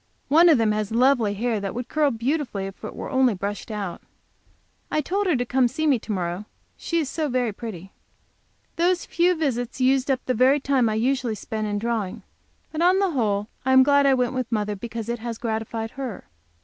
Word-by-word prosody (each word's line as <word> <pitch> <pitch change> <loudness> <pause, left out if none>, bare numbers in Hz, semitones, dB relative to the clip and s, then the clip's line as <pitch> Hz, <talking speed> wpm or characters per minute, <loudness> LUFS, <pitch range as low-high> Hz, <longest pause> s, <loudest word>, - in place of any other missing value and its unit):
One 335 +5 +6
of 310 - +6
them 225 -2 +2
has 210 0 -2
lovely 235 -3 +3
hair 225 +1 -1
that 200 0 -4
would 245 0 -4
curl 300 0 +2
beautifully 240 -4 -2
if 195 0 -9
it - - -6
were - - -6
only 260 -4 +3
brushed 200 +4 -5
out. 205 -5 -4 0.9
I - - 0
told 390 +7 -1
her 350 - +3
to 245 -1 0
come 255 0 +2
to 240 - -9
see 315 -1 0
me 275 -6 +3
to 220 - -7
morrow, 180 0 -3 0.3
she 335 - -3
is 315 -4 0
so 305 +2 -2
very 245 -4 0
pretty. 195 -4 -8 0.9
Those 350 +1 +2
few 355 +2 +2
visits 255 -6 -2
used 265 +1 +2
up 265 -1 0
the 255 - +1
very 260 +5 +4
time 265 -4 +2
I 215 - -1
usually 245 0 0
spend 215 +1 -4
in 205 0 -1
drawing. 215 -3 -2 0.5
But 315 - -3
on 360 +2 +5
the 390 -2 +2
whole 210 -7 0 0.2
I 260 - +2
am 260 0 +8
glad 285 0 +4
I 270 - +5
went 250 -1 0
with 255 -2 -3
mother, 210 -2 -1
because 230 +1 -6
it 235 0 -3
has 230 0 -5
gratified 225 0 -3
her. 260 -7 -6
245 Hz, 215 wpm, -24 LUFS, 215-275 Hz, 0.9 s, am